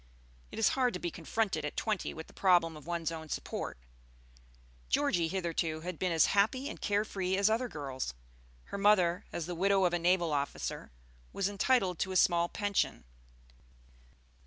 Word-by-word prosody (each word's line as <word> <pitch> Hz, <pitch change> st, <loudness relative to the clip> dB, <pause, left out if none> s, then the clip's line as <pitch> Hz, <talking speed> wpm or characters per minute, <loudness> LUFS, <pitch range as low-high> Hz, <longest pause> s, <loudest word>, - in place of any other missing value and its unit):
It -, -, -8 dB
is 225 Hz, -, +4 dB
hard 250 Hz, -4 st, +1 dB
to -, -, -3 dB
be 175 Hz, -, -3 dB
confronted 175 Hz, 0 st, -1 dB
at 150 Hz, -, -5 dB
twenty 215 Hz, -4 st, -1 dB
with 160 Hz, -, -8 dB
the -, -, -18 dB
problem 175 Hz, -4 st, +3 dB
of 150 Hz, +1 st, -12 dB
one's 170 Hz, -2 st, -2 dB
own 160 Hz, -1 st, -7 dB
support. -, -, -4 dB, 1.1 s
Georgie 165 Hz, -, +2 dB
hitherto 165 Hz, -3 st, -2 dB
had 180 Hz, -1 st, -6 dB
been 185 Hz, -1 st, 0 dB
as 165 Hz, -2 st, +5 dB
happy 225 Hz, +7 st, +2 dB
and -, -, -7 dB
care 205 Hz, +1 st, +1 dB
free 190 Hz, -2 st, -1 dB
as 200 Hz, +2 st, +3 dB
other 240 Hz, +3 st, +1 dB
girls. 135 Hz, -, -5 dB, 0.5 s
Her 200 Hz, -, -6 dB
mother, 185 Hz, -4 st, +3 dB
as 170 Hz, -, -3 dB
the 175 Hz, -, -4 dB
widow 195 Hz, +2 st, +2 dB
of 175 Hz, -, +2 dB
a 175 Hz, -, +1 dB
naval 175 Hz, -2 st, +2 dB
officer, 140 Hz, -, -3 dB, 0.4 s
was 195 Hz, -, 0 dB
entitled 200 Hz, -3 st, +1 dB
to 190 Hz, -, -1 dB
a -, -, -4 dB
small 175 Hz, -1 st, +4 dB
pension. 205 Hz, -, -1 dB
180 Hz, 175 wpm, -32 LUFS, 165-200 Hz, 1.1 s, as